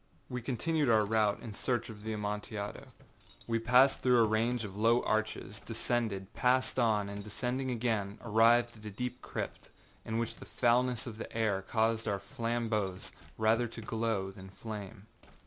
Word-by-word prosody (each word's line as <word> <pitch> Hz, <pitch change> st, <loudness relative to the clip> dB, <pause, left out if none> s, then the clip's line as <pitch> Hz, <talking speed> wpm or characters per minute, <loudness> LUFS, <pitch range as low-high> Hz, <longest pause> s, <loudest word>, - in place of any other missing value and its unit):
We 125 Hz, -1 st, -3 dB
continued 145 Hz, +4 st, 0 dB
our 110 Hz, -2 st, +5 dB
route 105 Hz, -1 st, +2 dB
in 115 Hz, -, -6 dB
search 120 Hz, +2 st, -1 dB
of 105 Hz, -2 st, -10 dB
the 110 Hz, -, -3 dB
Amontillado. 105 Hz, 0 st, -4 dB, 0.6 s
We 115 Hz, -1 st, 0 dB
passed 125 Hz, +4 st, +5 dB
through 125 Hz, -2 st, +5 dB
a -, -, +5 dB
range 115 Hz, +2 st, +1 dB
of 100 Hz, -2 st, -6 dB
low 115 Hz, +3 st, +3 dB
arches, 110 Hz, -1 st, -1 dB
descended, 110 Hz, -4 st, -2 dB
passed 130 Hz, +1 st, +2 dB
on, 110 Hz, -4 st, +2 dB
and 100 Hz, 0 st, -6 dB
descending 125 Hz, +5 st, -2 dB
again, 110 Hz, -4 st, -1 dB
arrived 115 Hz, +2 st, +4 dB
at 110 Hz, -, -14 dB
a -, -, -4 dB
deep 125 Hz, +4 st, -4 dB
crypt, -, -, -5 dB, 0.3 s
in 110 Hz, -, -2 dB
which 115 Hz, -1 st, -2 dB
the -, -, -10 dB
foulness 125 Hz, 0 st, +2 dB
of 115 Hz, -3 st, -7 dB
the -, -, -6 dB
air 105 Hz, -4 st, +1 dB
caused 115 Hz, +2 st, 0 dB
our 100 Hz, -, +1 dB
flambeaux 110 Hz, -4 st, -2 dB, 0.3 s
rather 115 Hz, +2 st, +3 dB
to 115 Hz, 0 st, -8 dB
glow 110 Hz, -3 st, -1 dB
than 95 Hz, -1 st, -11 dB
flame. 105 Hz, 0 st, -8 dB
110 Hz, 165 wpm, -32 LUFS, 105-120 Hz, 0.6 s, our